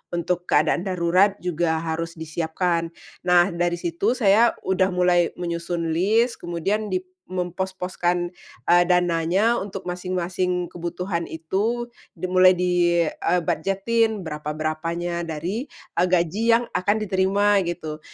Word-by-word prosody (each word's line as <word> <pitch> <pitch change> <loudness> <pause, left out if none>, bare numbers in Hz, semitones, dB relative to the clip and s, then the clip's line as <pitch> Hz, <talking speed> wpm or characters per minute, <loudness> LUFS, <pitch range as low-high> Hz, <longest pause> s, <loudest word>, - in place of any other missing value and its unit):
untuk 175 +1 -2
keadaan 180 - +2
darurat 185 +2 +3
juga 165 -2 0
harus 165 +1 -3
disiapkan. 165 +1 -1 0.4
Nah, 180 +1 +5
dari 175 0 0
situ 175 +7 -1
saya 230 0 +4
udah 185 0 +2
mulai 180 -2 +2
menyusun 170 -1 -3
list, 220 +8 +2
kemudian 185 +5 -2
dip 185 -2 -2 0.2
mempos-poskan, 180 -1 -2 0.4
eee, 175 0 +6
dananya 180 +5 +2
untuk 195 -1 -6
masing-masing 180 0 -2
kebutuhan 175 0 -3
itu 215 +9 -2 0.2
dimulai 185 0 +4
di 175 -1 +2
eee, 175 +2 0
...bujetin 200 +6 0
berapa-berapanya 160 +3 -3
dari, 180 - -3 0.3
eee, 180 - +4
gaji 180 +4 +1
yang 240 - +1
akan 205 +3 +1
diterima 200 0 +2
gitu. 155 -3 -5
180 Hz, 115 wpm, -23 LUFS, 170-190 Hz, 0.4 s, eee